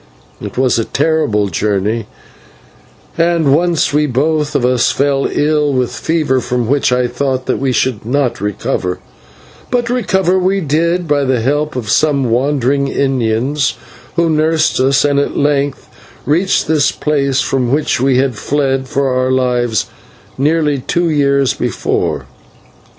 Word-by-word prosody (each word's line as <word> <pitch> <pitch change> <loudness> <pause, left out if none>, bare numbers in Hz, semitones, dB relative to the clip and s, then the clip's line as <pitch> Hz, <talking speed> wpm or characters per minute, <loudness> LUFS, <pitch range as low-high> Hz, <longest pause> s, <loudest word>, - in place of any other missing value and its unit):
It - - -7
was 130 -2 +2
a - - +1
terrible 145 -9 0
journey, 105 +4 -1 1.1
and 165 -4 +2
once 170 -2 +1
we 150 +1 +2
both 150 +3 0
of 125 - +2
us 125 -1 +2
fell 140 -1 0
ill 150 -1 +1
with 125 -2 0
fever 155 -5 0
from 125 -1 -2
which 140 0 +1
I 125 0 +2
thought 130 +1 -2
that - - -1
we 135 -1 0
should 125 -3 -1
not 125 -1 -1
recover; 95 -2 -2 0.7
but 245 -1 0
recover 190 -6 +1
we 190 +2 +1
did 170 +2 0
by 145 -1 +1
the 130 -2 +1
help 145 +5 -1
of 120 -4 -4
some 140 -6 +2
wandering 140 +2 +1
Indians 135 +1 0 0.4
who 170 0 +2
nursed 155 -1 +1
us, 135 +2 +3
and 145 -1 +2
at 140 - -2
length 145 -1 0 0.4
reached 170 +7 +1
this 150 -2 +2
place 140 -3 0
from 130 -2 -1
which 145 -3 0
we 130 -1 +2
had 135 -1 +1
fled 135 +2 -1
for 140 -2 0
our 130 0 0
lives 125 -3 0 0.5
nearly 150 0 +1
two 170 +6 -1
years 140 -2 +2
before. - - -2
140 Hz, 145 wpm, -15 LUFS, 125-150 Hz, 1.1 s, us